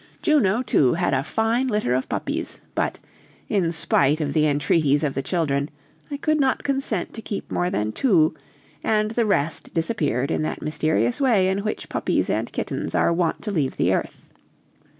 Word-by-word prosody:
Juno, 255 - +3
too, 135 - +3
had 175 -3 0
a 130 - +2
fine 225 - 0
litter 210 - 0
of 130 +1 -1
puppies, - - -3
but, - - -1 0.5
in 180 -5 +1
spite 155 -2 +2
of 145 -3 -2
the 155 0 +3
entreaties 145 0 +2
of 145 -3 0
the 135 - -2
children, 140 -2 -1 0.4
I 285 - -4
could 310 +2 +1
not 270 -2 +1
consent 270 -9 -1
to 225 - -6
keep 205 - -6
more 175 - 0
than 105 -8 -1
two, 170 - +3 0.5
and 215 0 +1
the 230 -1 +1
rest 160 -6 -1
disappeared 155 - 0
in - - 0
that 155 - -3
mysterious 155 - 0
way 215 -9 +3
in 190 +1 0
which 215 +1 -4
puppies - - 0
and - - -2
kittens - - -3
are - - +3
wont 170 -1 -1
to 210 - -3
leave 150 -8 -1
the - - +2
earth. - - -3
175 Hz, 180 wpm, -23 LUFS, 145-225 Hz, 0.5 s, Juno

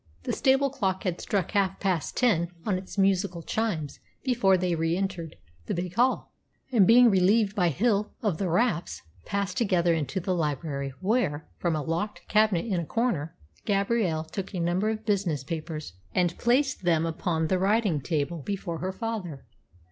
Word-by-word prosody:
The - - -2
stable 270 +1 +3
clock 190 -7 -1
had 180 -3 -2
struck 195 -3 -1
half 195 -2 +1
past 185 -5 -1
ten 180 -9 +2 0.2
on 205 - +1
its 185 +2 -7
musical 195 -3 +1
chimes 175 -11 -2 0.2
before 240 -8 +3
they 180 -1 0
re 165 +1 0
entered 185 -5 -3 0.3
the - - -1
big 175 0 -3
hall, 250 +5 +1 0.4
and, 215 -7 +5
being 240 +1 +7
relieved 200 +2 +3
by 180 -5 +3
Hill 210 - +1
of 195 -7 0
the 190 - 0
wraps, 170 - 0 0.2
passed 200 -2 -2
together 180 -6 +2
into 165 +4 -1
the 185 +1 -1
library, 145 -4 -2
where, 185 -8 0
from 170 -2 0
a 150 - -2
locked 170 +7 -3
cabinet 215 -4 +3
in 195 -6 0
a 170 - -3
corner, 210 - -1 0.3
Gabrielle 200 -5 +1
took 190 +5 -6
a - - -2
number 175 +5 +1
of 220 0 -4
business 185 - 0
papers 155 - -5 0.2
and 175 -1 +2
placed 265 +3 +2
them 165 -3 +2
upon 165 0 -1
the 185 +3 +1
writing 200 -5 +2
table 155 +2 -2
before 175 -1 -4
her 185 +1 -2
father. 190 - -5
185 Hz, 170 wpm, -27 LUFS, 165-210 Hz, 0.4 s, being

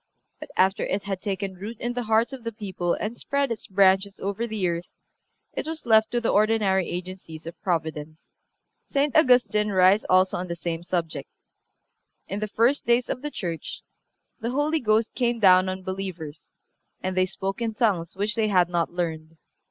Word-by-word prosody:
But 305 - -9
after 190 +1 +3
it 195 +1 -1
had 195 -2 -4
taken 195 -1 -3
root 210 +3 -7
in 240 +1 -2
the 245 - -2
hearts 225 +4 +3
of 260 -3 -8
the 230 - -3
people 190 -5 -2
and 215 +3 -4
spread 280 +1 -1
its 225 - -4
branches 195 0 +3
over 200 +4 -2
the 215 -5 -1
earth 170 0 -3 0.7
it - - -4
was 320 -2 -5
left 220 -1 +5
to 240 - 0
the 235 - -1
ordinary 205 -3 +2
agencies 175 -3 -7
of 165 +1 -9
Providence. 160 -4 -3 0.5
St. 285 0 0
Augustine 245 -7 +4
writes 190 +1 +5
also 185 0 +4
on 180 +1 -4
the 170 - -3
same 170 -1 -4
subject: 165 -5 -3 1.0
"In 200 - -3
the 215 - -2
first 235 +7 +1
days 240 +1 +3
(of 250 - -3
the 295 - -3
Church) 170 - -5 0.6
the 230 0 -2
Holy 295 +5 +1
Ghost 220 -2 +1
came 240 -2 0
down 185 -2 +6
on 185 0 -5
believers, 185 -5 -6 0.5
and 185 0 -2
they 185 0 +3
spoke 195 +3 -4
in 225 -2 -2
tongues 195 -8 0
which 205 +2 -1
they 220 -1 +1
had 180 -4 +3
not 170 -1 0
learned.... 165 -2 -4
195 Hz, 185 wpm, -25 LUFS, 180-230 Hz, 1.0 s, down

